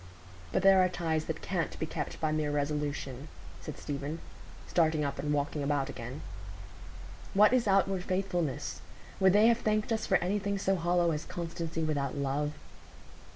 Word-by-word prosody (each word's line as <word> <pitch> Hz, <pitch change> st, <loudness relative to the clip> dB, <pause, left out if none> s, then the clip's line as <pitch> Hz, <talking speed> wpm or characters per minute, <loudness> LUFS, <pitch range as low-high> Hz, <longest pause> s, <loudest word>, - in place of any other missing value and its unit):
"But -, -, +1 dB
there 195 Hz, -1 st, +7 dB
are 185 Hz, -, +3 dB
ties 160 Hz, -3 st, -1 dB
that 160 Hz, -1 st, -4 dB
can't 180 Hz, -4 st, -2 dB
be -, -, -2 dB
kept -, -, -5 dB
by 155 Hz, -1 st, 0 dB
mere 155 Hz, -1 st, 0 dB
resolution," 145 Hz, -2 st, -2 dB, 0.3 s
said -, -, -7 dB
Stephen, 145 Hz, +2 st, -4 dB, 0.5 s
starting 155 Hz, -3 st, +2 dB
up 140 Hz, -, -3 dB
and 150 Hz, -, -1 dB
walking 145 Hz, +1 st, 0 dB
about 140 Hz, -1 st, 0 dB
again. 125 Hz, +5 st, -7 dB, 1.1 s
"What 210 Hz, +4 st, +6 dB
is 245 Hz, -3 st, +3 dB
outward 195 Hz, -1 st, +2 dB
faithfulness? 180 Hz, -6 st, -2 dB, 0.4 s
Would 190 Hz, -1 st, +5 dB
they 210 Hz, +2 st, +6 dB
have 235 Hz, 0 st, +5 dB
thanked 215 Hz, 0 st, 0 dB
us 220 Hz, -1 st, 0 dB
for -, -, +5 dB
anything 200 Hz, +2 st, -1 dB
so 195 Hz, 0 st, +1 dB
hollow 175 Hz, -1 st, +2 dB
as 150 Hz, 0 st, -2 dB
constancy 165 Hz, -1 st, -4 dB
without 145 Hz, -3 st, -1 dB
love?" 140 Hz, +2 st, -1 dB
160 Hz, 160 wpm, -31 LUFS, 145-190 Hz, 1.1 s, there